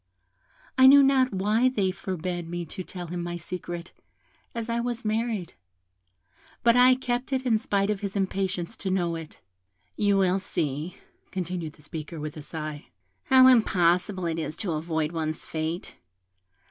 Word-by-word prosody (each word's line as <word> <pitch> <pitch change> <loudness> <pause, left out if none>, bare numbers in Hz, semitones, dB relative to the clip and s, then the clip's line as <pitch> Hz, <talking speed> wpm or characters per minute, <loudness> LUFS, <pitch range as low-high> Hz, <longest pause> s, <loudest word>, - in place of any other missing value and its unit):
I 260 - +9
knew 280 +1 +9
not 265 -1 +4
why 210 +6 +2
they 200 -7 0
forbad 180 -2 -4
me 175 0 -4
to 185 +4 -7
tell 180 0 -7
him 175 +1 -4
my 175 0 -4
secret, 175 0 -6 0.6
as 230 -1 -3
I 235 0 -1
was 240 0 -3
married; 215 -4 -1 1.1
but 235 0 +5
I 250 +1 +7
kept 250 0 -2
it 265 -1 -1
in 225 -3 +3
spite 200 -1 0
of 205 - -2
his 200 0 -4
impatience 190 0 -1
to 195 - -3
know 175 -3 0
it. 165 -2 -9 0.5
You 200 -1 +2
will 190 0 +3
see," 155 0 -3 0.3
continued 180 -4 -4
the 150 - -19
speaker, 155 +1 -7
with 150 0 -5
a 155 - -7
sigh, 155 -1 -6 0.4
"how 260 -2 +7
impossible 185 -6 +4
it 165 -1 -1
is 155 -1 -4
to 195 - -3
avoid 160 0 -1
one's 155 -2 -3
fate. 160 +2 -4
185 Hz, 160 wpm, -26 LUFS, 165-225 Hz, 1.1 s, I